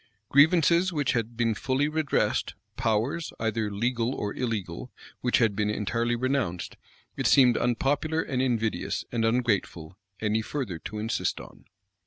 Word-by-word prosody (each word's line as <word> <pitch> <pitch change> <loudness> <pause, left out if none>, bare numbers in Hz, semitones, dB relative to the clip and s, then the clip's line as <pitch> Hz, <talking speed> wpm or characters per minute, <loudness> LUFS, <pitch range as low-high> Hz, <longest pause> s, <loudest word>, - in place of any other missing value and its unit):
Grievances 170 +5 +5
which 145 -5 0
had 115 0 -2
been 115 -1 +2
fully 130 +6 0
redressed; 155 -1 0 0.2
powers, 120 +7 0
either 110 -1 -1
legal 120 +4 -1
or 105 0 -3
illegal, 110 -3 -4 0.3
which 125 - +2
had 110 -4 +2
been 105 0 0
entirely 115 +3 0
renounced; 120 -9 -1 0.4
it - - 0
seemed 125 -4 +6
unpopular, 145 +6 0
and 130 -2 -2
invidious, 115 -4 -1
and 115 -2 0
ungrateful, 105 -7 0 0.2
any 110 +1 0
further 110 - -4
to 105 - -7
insist 110 +1 -1
on. - - -13
120 Hz, 140 wpm, -27 LUFS, 110-135 Hz, 0.4 s, seemed